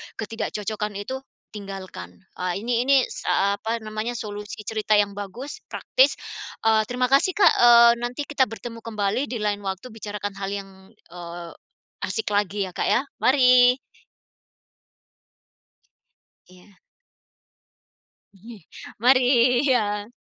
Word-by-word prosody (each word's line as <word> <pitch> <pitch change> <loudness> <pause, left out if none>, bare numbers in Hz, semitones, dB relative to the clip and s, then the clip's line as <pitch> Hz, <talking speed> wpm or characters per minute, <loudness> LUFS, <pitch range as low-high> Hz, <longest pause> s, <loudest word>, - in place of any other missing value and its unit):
ketidakcocokan 210 -1 -4
itu, 260 +7 -5 0.3
tinggalkan." 190 - -9 0.2
Ah, 180 -1 -1
Ini 240 +4 -1
ini 275 -2 +5
sa 200 +1 0
apa 225 +1 -3
namanya, 215 +3 -4
solusi 210 -1 -7
cerita 215 0 0
yang 205 -1 +3
bagus, 220 - -7
praktis. - - +2 0.5
Eee, 220 -1 +3
terima 250 +1 -1
kasih, 285 +7 +3
Kak, 410 - +6
eee, 235 -1 +8
nanti 245 +4 -3
kita 280 -3 +1
bertemu 230 +1 -8
kembali, 220 +3 -2
dilain 210 -3 -2
waktu 195 +4 -6
bicarakan 205 -2 -5
hal 195 - -3
yang, 195 -1 -7 0.4
eee, 170 -1 -8 0.5
asik 445 - -3
lagi 205 0 0
ya, 185 - -5
Kak, - - -2
ya. 260 - +2 0.2
Mari. 250 -1 +5 2.7
Iya. 185 +2 -20 1.6
Iye. 215 +3 -13 0.4
Mari. 255 0 +5 0.4
Iya. 210 -4 +1
215 Hz, 115 wpm, -24 LUFS, 200-245 Hz, 2.7 s, eee